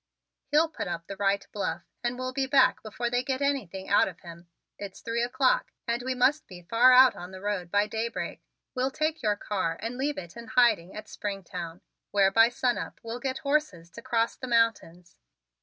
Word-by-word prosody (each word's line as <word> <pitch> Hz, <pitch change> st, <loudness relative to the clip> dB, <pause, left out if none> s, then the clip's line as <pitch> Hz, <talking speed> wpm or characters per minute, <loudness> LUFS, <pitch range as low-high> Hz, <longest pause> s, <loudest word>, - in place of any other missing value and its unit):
He'll 305 Hz, +3 st, +4 dB
put 315 Hz, -, -6 dB
up 170 Hz, -1 st, -4 dB
the 195 Hz, -, -7 dB
right 195 Hz, 0 st, 0 dB
bluff 175 Hz, -4 st, -3 dB, 0.2 s
and 240 Hz, +1 st, -1 dB
we'll 255 Hz, 0 st, -4 dB
be 270 Hz, 0 st, -1 dB
back 270 Hz, -1 st, +4 dB
before 235 Hz, +2 st, -4 dB
they 245 Hz, 0 st, +2 dB
get 260 Hz, 0 st, -2 dB
anything 215 Hz, -10 st, -2 dB
out 200 Hz, -, +4 dB
of -, -, -9 dB
him. 170 Hz, -1 st, -12 dB, 0.3 s
It's 200 Hz, -2 st, -7 dB
three 230 Hz, 0 st, -2 dB
o'clock 255 Hz, +2 st, +1 dB, 0.2 s
and 235 Hz, +1 st, 0 dB
we 255 Hz, +1 st, -2 dB
must 265 Hz, +5 st, +2 dB
be 180 Hz, -2 st, -11 dB
far 230 Hz, +7 st, +5 dB
out 255 Hz, 0 st, +7 dB
on 175 Hz, +1 st, -8 dB
the 190 Hz, 0 st, -10 dB
road 195 Hz, -3 st, -3 dB
by 205 Hz, +3 st, +3 dB
daybreak. 225 Hz, +2 st, -4 dB, 0.3 s
We'll 255 Hz, 0 st, 0 dB
take 310 Hz, +3 st, -2 dB
your 210 Hz, -1 st, +1 dB
car 190 Hz, -5 st, -2 dB
and 235 Hz, +3 st, -5 dB
leave 290 Hz, +2 st, -1 dB
it 170 Hz, +1 st, -8 dB
in 235 Hz, -1 st, -9 dB
hiding 220 Hz, -7 st, +3 dB
at 215 Hz, 0 st, -8 dB
Springtown, 180 Hz, -5 st, -6 dB, 0.3 s
where 195 Hz, -1 st, +3 dB
by 225 Hz, +3 st, +6 dB
sunup 245 Hz, 0 st, -2 dB
we'll 230 Hz, +1 st, -5 dB
get 260 Hz, +1 st, -2 dB
horses 280 Hz, -, 0 dB
to 235 Hz, -, -10 dB
cross 230 Hz, -2 st, 0 dB
the 255 Hz, -, -7 dB
mountains." 225 Hz, -7 st, 0 dB
230 Hz, 200 wpm, -28 LUFS, 195-255 Hz, 0.3 s, out